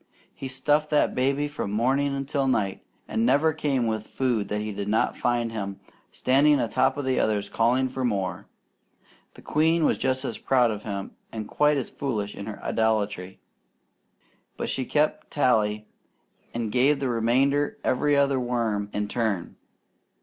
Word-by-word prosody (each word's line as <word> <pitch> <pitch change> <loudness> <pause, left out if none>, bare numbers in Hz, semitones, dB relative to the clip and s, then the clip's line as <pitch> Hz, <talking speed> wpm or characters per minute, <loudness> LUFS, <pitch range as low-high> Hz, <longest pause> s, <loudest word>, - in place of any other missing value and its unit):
He 135 - -6
stuffed 150 +3 +1
that 150 - +2
baby 140 +3 +1
from 145 -8 -4
morning 135 +6 +1
until 135 0 -1
night, 105 -7 0 0.2
and 110 - -1
never 145 +6 +3
came 140 -5 0
with 110 -1 -2
food 120 -6 -1
that 105 - -1
he 105 0 -3
did 100 0 -4
not 110 +2 +1
find 120 -1 0
him 100 -3 -5 0.3
standing 140 +3 +3
a 120 - +1
top 130 +3 +2
the 130 -2 0
others 105 -2 0
calling 125 +3 +2
for 130 0 -4
more. 100 -6 -2 0.9
The - - -14
queen 160 +1 +2
was - - +1
just 130 +1 0
as 115 - -4
proud 125 -3 +3
of 105 -1 -5
him 100 -2 -5 0.2
and 110 -2 -5
quite 150 +4 +2
as 130 - -3
foolish 105 -7 -3
in 100 - -8
her 105 - -6
idolatry, 105 -4 -1 1.2
but - - -3
she 130 - -2
kept 150 +4 0
tally 110 -6 +1 0.7
and 115 -2 -3
gave 135 +4 +3
the 135 - -1
remainder 130 +6 +1
every 145 +3 +2
other 140 -1 +3
worm 115 -5 -1
in 105 0 -1
turn. 105 -6 -2
125 Hz, 165 wpm, -26 LUFS, 105-140 Hz, 1.2 s, never